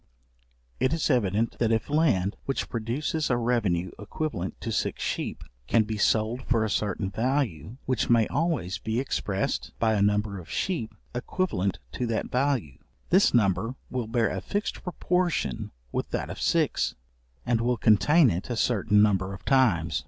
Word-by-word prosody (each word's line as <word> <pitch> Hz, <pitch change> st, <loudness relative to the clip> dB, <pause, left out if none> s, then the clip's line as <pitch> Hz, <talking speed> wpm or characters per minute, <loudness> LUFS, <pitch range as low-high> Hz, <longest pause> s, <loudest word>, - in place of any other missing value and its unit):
It 130 Hz, -, +2 dB
is 165 Hz, -2 st, +1 dB
evident, 110 Hz, -2 st, +1 dB
that 115 Hz, -1 st, +2 dB
if 110 Hz, -1 st, +1 dB
land, 130 Hz, -, +2 dB
which 135 Hz, -, -2 dB
produces 130 Hz, +7 st, -2 dB
a 125 Hz, -, +2 dB
revenue 105 Hz, -7 st, 0 dB
equivalent 105 Hz, -, -4 dB
to 115 Hz, -, -3 dB
six 100 Hz, -, -1 dB
sheep, -, -, -3 dB, 0.2 s
can 115 Hz, -, +4 dB
be 110 Hz, 0 st, -4 dB
sold 110 Hz, +4 st, +2 dB
for 115 Hz, -3 st, +2 dB
a 110 Hz, -, -2 dB
certain 100 Hz, -1 st, -1 dB
value, 115 Hz, -, -1 dB
which 130 Hz, -3 st, 0 dB
may 115 Hz, -2 st, +5 dB
always 145 Hz, -, -1 dB
be 110 Hz, +2 st, -2 dB
expressed 100 Hz, -7 st, -2 dB
by 110 Hz, -1 st, +2 dB
a 105 Hz, -, +1 dB
number 105 Hz, -1 st, +1 dB
of 80 Hz, -3 st, -12 dB
sheep 165 Hz, -, -2 dB, 0.2 s
equivalent 120 Hz, -, -1 dB
to 120 Hz, -, -2 dB
that 115 Hz, -1 st, -2 dB
value; 125 Hz, -, 0 dB, 0.3 s
this 190 Hz, +3 st, +5 dB
number 115 Hz, +2 st, +2 dB, 0.2 s
will 125 Hz, -3 st, -2 dB
bear 115 Hz, 0 st, +1 dB
a -, -, -3 dB
fixed 205 Hz, +1 st, -3 dB
proportion 180 Hz, -, -1 dB, 0.2 s
with -, -, -2 dB
that -, -, -3 dB
of -, -, -7 dB
six, -, -, +1 dB, 0.5 s
and 115 Hz, -1 st, +1 dB
will 120 Hz, +1 st, +1 dB
contain 130 Hz, +7 st, +5 dB
it 90 Hz, +7 st, -4 dB
a 120 Hz, -, -1 dB
certain 105 Hz, -3 st, +3 dB
number 95 Hz, -2 st, +1 dB
of -, -, -15 dB
times. 95 Hz, -, +3 dB
115 Hz, 165 wpm, -27 LUFS, 100-130 Hz, 0.5 s, may